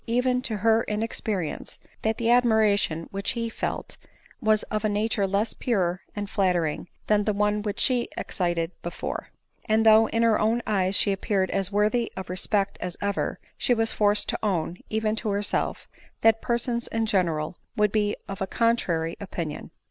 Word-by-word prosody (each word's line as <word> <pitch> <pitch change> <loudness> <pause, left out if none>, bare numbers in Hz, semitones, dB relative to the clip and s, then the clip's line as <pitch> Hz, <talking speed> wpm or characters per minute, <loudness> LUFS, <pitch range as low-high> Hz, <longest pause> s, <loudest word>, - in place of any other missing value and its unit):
even 250 +2 +1
to 225 -4 -3
her 225 +2 +3
inexperience, 210 -5 -3 0.2
that 220 0 0
the 230 - -1
admiration 215 -9 +3
which 195 0 -1
he 235 -1 -3
then - - -15
felt - - -4 0.4
was 215 -1 +3
of 215 -1 -3
a 215 - +2
nature 205 -1 0
less 200 +3 0
pure 185 -6 -1
and 205 -1 -3
flattering 180 -7 0 0.2
than 210 -1 +3
the 210 - +1
one 210 +1 +1
which 205 -1 -3
she 250 -2 +2
excited 175 -3 -1
before; 175 0 -5 0.4
and 220 0 +2
though 220 0 +7
in 230 +1 0
her 225 -2 +4
own 225 +2 +2
eyes 195 -2 +1
she 200 - +5
appeared 195 0 0
as 195 0 +1
worthy 215 +3 +1
r>f 190 -2 -6
respect 195 +2 0
as 180 -1 -4
ever, 200 -1 -2 0.2
she 245 - +3
was 225 0 +1
forced 205 0 +3
to^own, 175 -5 -1
even 220 0 0
to 220 0 -1
herself, 205 0 -1 0.3
that 225 0 +4
persons 235 0 0
in 225 0 -1
general 170 -7 +1
u - - -14 0.2
would 210 -1 +3
be 210 -1 +1
of 195 0 -7
a 195 - 0
contrary 180 -9 0
opinion. 170 -6 -5
210 Hz, 175 wpm, -26 LUFS, 190-225 Hz, 0.4 s, though